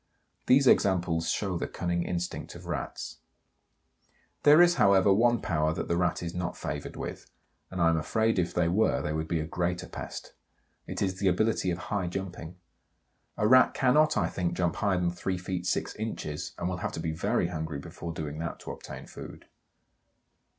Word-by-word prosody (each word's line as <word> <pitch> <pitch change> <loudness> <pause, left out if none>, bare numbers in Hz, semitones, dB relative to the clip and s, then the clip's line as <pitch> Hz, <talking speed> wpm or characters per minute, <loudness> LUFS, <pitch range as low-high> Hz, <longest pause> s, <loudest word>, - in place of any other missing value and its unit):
These 135 +2 +6
examples 85 -7 +3
show 95 -4 -1
the - - -2
cunning 85 0 -2
instinct 90 0 -4
of - - -11
Rats. - - -5 1.2
There 150 +2 +7
is, 175 0 +6
however, 100 0 +6
one 120 +3 +3
power 80 -1 0
that - - -3
the 85 - +1
Rat 90 0 0
is 85 0 -4
not 90 -1 -3
favoured - - -5
with, - - -6 0.4
and 95 - -6
I 85 -1 +5
am 80 - +2
afraid 110 +6 +1
if 90 - 0
they 85 -1 +1
were 90 -6 +2
they 75 - -2
would 80 +1 -2
be 85 -1 0
a 80 - -2
greater 90 +2 -2
pest. - - -7 0.5
It - - -2
is 95 -1 -2
the 100 - +1
ability 95 +1 +2
of 85 - -1
high 95 0 -2
jumping. 90 -2 -5 0.8
A 105 - +2
Rat 130 +1 +6
cannot, 150 +3 +4
I 90 -6 +2
think, 90 0 -2
jump 85 -2 0
higher 100 -3 +1
than 90 -1 +1
three 90 +1 -3
feet 90 0 -4
six - - -1
inches, 105 -9 -4
and 85 - -2
will 90 0 -2
have 90 - -3
to - - -4
be 80 0 -2
very 85 +2 0
hungry 80 -3 -4
before 85 +4 -7
doing 75 -2 -5
that 85 +1 -4
to - - -6
obtain - - -9
food. - - -10
90 Hz, 190 wpm, -29 LUFS, 85-100 Hz, 1.2 s, There